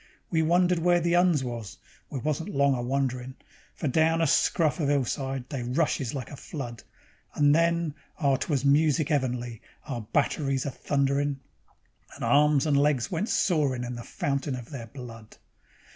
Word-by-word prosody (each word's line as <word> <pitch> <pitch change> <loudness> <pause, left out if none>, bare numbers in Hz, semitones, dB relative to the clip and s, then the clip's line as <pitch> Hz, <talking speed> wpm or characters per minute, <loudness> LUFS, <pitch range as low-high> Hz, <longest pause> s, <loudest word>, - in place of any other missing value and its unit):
We 160 -2 +2
wondered 175 +2 +3
where 175 +1 +3
the 170 +1 +1
'Uns 175 -6 +3
was 120 -5 -6 0.3
we - - -5
wasn't 150 +4 -2
long 140 0 +2
a 125 - -2
wonderin', 130 0 -2 0.4
For 155 - -3
down 160 +4 +3
a 165 - +3
scruff 155 +2 +2
of 145 -3 +1
'ill 140 -3 +2
side 135 0 -3
they 135 -4 -4
rushes 130 0 -1
like 130 -3 -5
a - - -7
flood; 125 -5 -7 0.6
Then 165 +2 +3 0.3
oh! 140 -4 +3
'twas 140 0 -1
music 150 +2 +3
'eavenly, 125 -5 -1 0.2
our 125 -5 -4
batteries 135 +3 0
a 140 - -2
thunderin', 140 +1 0 0.8
And - - -8
arms 150 0 +4
and 145 -2 +2
legs 140 -4 +2
went 185 +6 -1
soarin' 145 -9 +1
in 125 0 -4
the 120 - -6
fountain 140 +2 -2
of 125 +2 -9
their 125 -5 -7
blood. 115 -3 -11
140 Hz, 165 wpm, -27 LUFS, 130-155 Hz, 0.8 s, arms